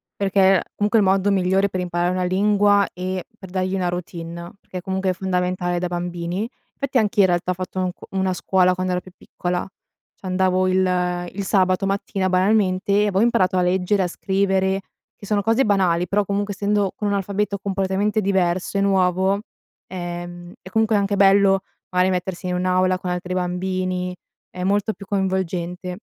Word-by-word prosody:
perché 195 -1 +3
comunque 210 +2 +2
è - - +4
il 190 - +2
modo 195 +1 +3
migliore 195 0 +2
per 185 - -3
imparare 175 0 0
una 185 0 -1
lingua 205 +2 +3
e 185 0 -4
per 190 - -11
dargli 185 0 -1
una 180 -2 0
routine, 170 -1 -6
perché 180 -1 -8
comunque 190 0 -1
è - - -2
fondamentale 180 -1 -1
da 180 - -1
bambini, 175 +4 -3 0.3
fatti 275 -2 -1
anch'io 210 -2 +3
in 190 - +6
realtà 175 0 0
ho - - +1
fatto 185 +1 -5
un 185 -1 0
c - - -41
una 190 -1 0
scuola 185 0 +2
quando 185 0 -2
ero 180 - -1
più 185 - -15
piccola, 180 -2 -4 0.5
c'andavo 185 0 +1
il 180 -1 +1
il 200 - -3
sabato 185 -1 +2
mattina, 195 -1 -1
banalmente, 190 +1 +2
e 205 - +4
avevo 195 0 +1
imparato 210 -6 +2
a - - +3
leggere, 185 +3 +1
a 180 - +1
scrivere, 190 +1 0 0.4
che - - -12
sono 205 -1 +1
cose 225 +5 +3
banali 180 -4 +2
però, 205 0 +1
comunque, 205 +1 -1
essendo 205 -1 0
con 210 - -3
un 205 - +1
alfabeto 200 +1 -1
completamente 195 +2 0
diverso 185 -1 0
e - - +2
nuovo, 190 0 +2 0.4
ehm, 175 -1 -7
è 185 - -10
comunque 220 0 +2
anche 200 0 +1
bello 195 0 +5 0.3
magari 180 +1 +3
mettersi 180 0 -3
in 180 - -1
un'aula 185 0 +2
con 180 -1 -4
altri 180 +1 -3
bambini, 180 0 -2 0.3
è 180 - -6
molto 205 +3 +1
più 195 - -12
coinvolgente, 185 -2 -2
185 Hz, 180 wpm, -22 LUFS, 180-200 Hz, 0.5 s, in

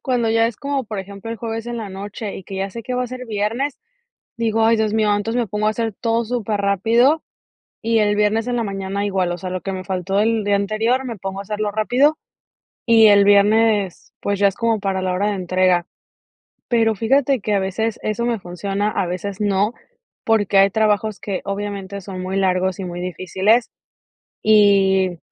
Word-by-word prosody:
cuando 245 -3 0
ya 225 0 +3
es, 230 -2 -4
como 280 0 -2
por 215 -2 -6
ejemplo, 200 +3 -7
el 230 - -4
jueves 225 0 -5
en 240 0 -4
la 220 -3 -5
noche, 200 +2 -6
y 190 - -10
que 195 - -7
ya 195 +1 -2
sé 230 +3 -7
que 250 - -4
va 250 - 0
a - - -4
ser 255 +1 -8
viernes, 225 +6 -2 0.6
digo: 225 -1 +1
"Ay, 230 +1 +4
Dios 220 -1 0
mío", 215 -2 +2
entonces 225 +4 -2
me 235 - -1
pongo 210 +1 -2
a - - +4
hacer 225 -1 -2
todo 230 +2 0
superrápido, 225 - +1 0.6
y 230 0 +2
el 205 -1 +2
viernes 210 +2 +1
en 245 - -1
la 235 - 0
mañana 195 0 -3
igual. 190 -3 0
O 175 - -3
sea, 185 +1 -6
lo 185 0 -4
que 195 - -4
me 185 - -5
faltó 190 +1 -1
el 220 0 +1
día 205 0 +2
anterior 220 +6 0
me 235 -4 -5
pongo 195 +1 -5
a - - -5
hacerlo 210 +1 -3
rápido 250 +9 +2 0.7
y 225 -2 +7
el 200 -1 +6
viernes, 205 -1 +3
pues, 200 -1 -1
ya 200 0 +5
es 195 - -5
como 230 -2 0
para 195 -1 -1
la 185 -1 0
hora 195 +3 0
de 210 - -1
entrega. 185 -1 +1 0.8
Pero 225 -3 +2
fíjate 265 +5 +2
que 210 +1 -2
a 200 - +3
veces 220 +4 -2
eso 215 +2 -1
me 235 -2 0
funciona, 195 +3 -2
a 195 - -1
veces 185 +3 -5
no, 205 +2 +1 0.5
porque 210 -3 +2
hay 195 0 +6
trabajos 215 0 0
que 195 -3 -4
obviamente 200 -1 -4
son 185 -1 -7
muy 185 +1 -4
largos 185 -1 +1
y - - -3
muy 175 0 -6
difíciles, 190 +6 +1 0.7
y 195 -4 +4
205 Hz, 205 wpm, -20 LUFS, 195-225 Hz, 0.8 s, y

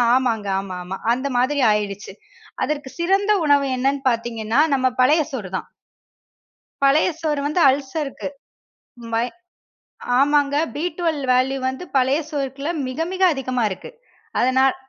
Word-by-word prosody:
ஆமாங்க, 230 -5 0
ஆமா, 195 -1 -6
ஆமா 185 +2 -5 0.2
அந்த 260 +3 -2
மாதிரி 275 +3 +1
ஆயிடுச்சு. 205 -2 -3 0.5
அதற்கு 290 -2 -3
சிறந்த 390 +4 +2
உணவு 285 -1 +4
என்னன்னு 275 +2 0
பாத்தீங்கன்னா, 230 0 -1 0.2
நம்ம 260 -1 +2
பழைய 300 +6 +5
சோறு 210 -8 -4
தான். - - -8 1.2
பழைய 275 +3 +4
சோறு 300 -3 0
வந்து 300 +4 -1
அல்சர்க்கு 275 +1 -2 0.9
மை 230 +1 +2 0.9
ஆமாங்க, 285 0 +3 0.2
பி 295 - -3
12 315 -6 -1
வேல்யூ 260 +2 +2
வந்து 260 +7 -5
பழைய 265 +2 +3
சோறுக்குள்ள 275 +1 -3 0.2
மிக, 255 +4 -6
மிக 375 - -3
அதிகமா 255 -3 -2
இருக்கு. 190 - -7 0.5
அதனால் 260 +2 +3
270 Hz, 130 wpm, -21 LUFS, 245-290 Hz, 1.2 s, பழைய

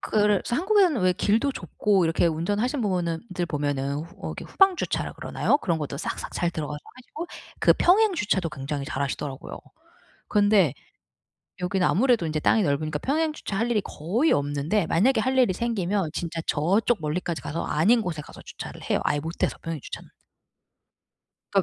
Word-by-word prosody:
그래 210 -2 +2
한국에는 360 - +3
왜 185 0 +4
길도 215 +8 +1
좁고 205 -7 +1
이렇게 165 +1 +2
운전하신 205 - 0
부분은 175 -6 -1
들 175 -1 -1
보면은 145 -2 -1
어 165 +3 -7
이렇게 - - -6
후방 390 -2 +4
주차라 - - -2
그러나요? - - +1
그런 170 - -1
것도 145 -2 -4
싹싹 - - -5
잘 175 - 0
들어가서 150 -3 -4 0.2
하시고 290 +6 -8 0.3
그 - - +6
평행 405 +3 +4
주차도 200 - 0
굉장히 140 0 -4
잘하시더라고요. 140 0 -4 0.7
근데 205 - +4 0.9
여기는 180 +1 +1
아무래도 235 -3 +3
인제 155 -1 -1
땅이 215 +7 +3
넓으니까 150 0 -1
평행 310 - 0
주차 200 -9 -5
할 230 +3 0
일이 215 -3 +2
거의 210 - 0
없는데 145 +6 +1
만약에 235 +11 +3
할 260 0 0
일이 245 -7 +4
생기면 200 -5 -1
진짜 170 -1 -4
저쪽 195 +9 +2
멀리까지 160 +2 -2
가서 165 +3 -4
아닌 210 +11 +3
곳에 170 -7 -4
가서 - - -13
주차를 - - -9
해요. - - +2
아예 145 - +1
못해서 160 +3 -2
평행주차는. 165 -4 -6 1.4
그니까. - - +4
180 Hz, 390 characters per minute, -25 LUFS, 155-235 Hz, 1.4 s, 그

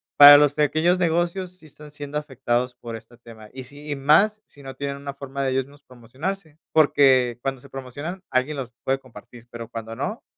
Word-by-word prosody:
para 145 0 +11
los 145 -1 +4
pequeños 155 +5 +2
negocios 175 +2 0
sí 165 - -17
están 150 0 -14
siendo 145 0 -6
afectados 125 -4 -2
por 120 -2 -8
este 115 +2 -13
tema, 115 -2 -14
y 130 -1 -9
sí, 145 +3 -12
y 145 - -2
más 195 +10 +3
si 140 - -18
no 135 0 -8
tienen 140 -1 -4
una 140 0 -7
forma 140 0 -6
de 135 - 0
ellos 130 0 0
mismos 145 +1 -19
promocionarse, 145 - -7
porque, 130 -6 +4
cuando 135 0 -3
se 140 - -16
promocionan 145 +8 -7
alguien 130 +4 0
los 130 -3 -6
puede 135 0 0
compartir, 120 -2 -15
pero, 115 -1 -8
cuando 115 -1 -8
no, 210 - -4
140 Hz, 200 wpm, -23 LUFS, 125-150 Hz, -, para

